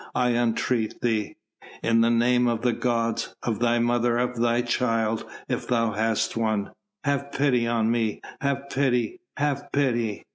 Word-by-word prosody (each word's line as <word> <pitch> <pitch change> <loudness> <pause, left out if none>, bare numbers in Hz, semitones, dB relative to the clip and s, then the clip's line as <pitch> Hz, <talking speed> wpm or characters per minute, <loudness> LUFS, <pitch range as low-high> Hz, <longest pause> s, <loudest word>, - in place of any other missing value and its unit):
I 125 -1 +2
entreat 115 -1 0
thee! 110 -4 0 0.5
In 115 0 +3
the 115 - +4
name 120 +1 +3
of 115 -1 -1
the 125 -1 +2
gods, 115 -1 -1
of 115 -3 -1
thy 120 0 +2
mother, 120 0 +2
of 125 0 0
thy 120 0 +2
child 115 -2 0 0.2
if - - -3
thou 115 -2 +1
hast 110 +1 0
one, 110 -3 0 0.3
have 140 -1 -1
pity 125 -4 +2
on 115 -1 +1
me! 115 -3 0 0.2
have 140 0 -1
pity! 135 - 0 0.2
have 145 -1 -1
pity!" 120 -7 0
120 Hz, 155 wpm, -25 LUFS, 115-125 Hz, 0.5 s, the